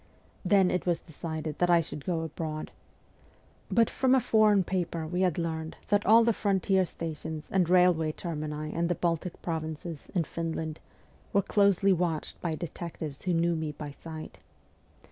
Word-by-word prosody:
Then 190 -1 +4
it 180 - -1
was 175 -2 +2
decided 160 -1 -6
that 175 - +3
I 170 -1 +6
should 150 -3 -6
go 170 -3 0
abroad. 155 -1 -5 1.0
But 230 -2 +4
from 260 0 +2
a - - +5
foreign 215 -4 +4
paper 170 -3 -2
we 180 +3 -2
had 180 -4 +2
learned 160 -1 -3
that 205 0 +2
all 225 +2 +8
the 230 0 +3
frontier 195 -2 +2
stations 160 -2 -6
and 180 -3 +2
railway 180 -3 +4
termini 155 -2 -4
in 170 +1 0
the 175 - 0
Baltic 170 +1 -2
provinces 160 -1 -4
and 170 -3 +2
Finland 160 -1 -4 0.5
were 200 - +4
closely 200 -1 +4
watched 170 -3 -2
by 165 -2 -1
detectives 160 -2 -6
who 180 - +1
knew 170 +1 +2
me 160 -2 -3
by 145 0 -7
sight. 155 +2 -9
170 Hz, 165 wpm, -29 LUFS, 160-185 Hz, 1.0 s, all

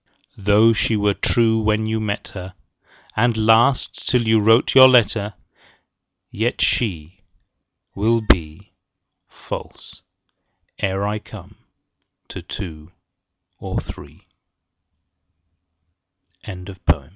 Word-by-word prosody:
Though 105 +3 +4
she 110 +1 0
were 105 -1 +1
true 110 +1 +1
when 110 0 0
you 110 0 -2
met 105 -2 -4
her, 90 -1 -10 0.6
And 115 0 +1
last 115 +4 +2
till 120 -3 +1
you 110 0 +4
write 115 +3 +3
your 130 -1 +9
letter, 110 -4 +2 1.0
Yet 115 +4 -2
she 95 -4 -2 0.7
25 - - -20
Will 115 +1 +2
be 80 -7 0 0.6
False, - - -10 0.8
ere 95 +1 -1
I 105 +1 -2
come, - - -13 0.8
to - - -8
two 80 -4 -9 0.7
or - - -4
thr - - -11
110 Hz, 100 wpm, -20 LUFS, 100-115 Hz, 1.0 s, your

